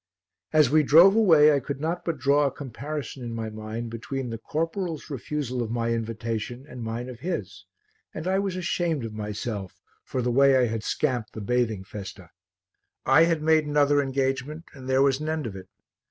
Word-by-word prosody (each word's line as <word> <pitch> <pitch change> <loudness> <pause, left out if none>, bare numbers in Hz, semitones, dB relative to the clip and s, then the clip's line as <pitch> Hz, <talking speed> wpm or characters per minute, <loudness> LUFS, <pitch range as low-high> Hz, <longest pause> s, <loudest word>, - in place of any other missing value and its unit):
As 150 -4 +4
we 155 +1 +5
drove 170 +7 +7
away 160 -9 +6
I 140 - +2
could 140 0 -5
not 165 +4 -2
but 165 -3 -2
draw 140 +2 +3
a - - -2
comparison 140 0 -6
in 115 -1 -5
my 110 -1 -4
mind 110 +2 -6
between 125 +2 -4
the 115 - -5
corporal's 165 - -3
refusal 130 -1 -3
of 115 - -3
my 115 0 -1
invitation 115 +2 -3
and 125 -4 -9
mine 115 +2 -4
of 125 -2 -9
his, 100 - -5 0.5
and 155 - -7
I 190 +1 +2
was 195 -2 -2
ashamed 170 -6 -1
of 110 - -6
myself 105 -2 -5 0.2
for 130 - -3
the 120 - 0
way 135 +1 +5
I 125 - +4
had 110 -2 -3
scamped 125 -5 -1
the - - -6
bathing 110 -2 0
festa. 95 0 -9 0.7
I 135 +5 +6
had 165 -2 0
made 155 -1 +3
another 145 -1 +3
engagement 135 +3 -2
and 130 -2 -9
there 130 +1 +4
was 135 -1 +2
an 155 +1 -3
end 155 -1 -2
of 105 -4 -5
it. 95 - -10
135 Hz, 195 wpm, -26 LUFS, 115-155 Hz, 0.7 s, drove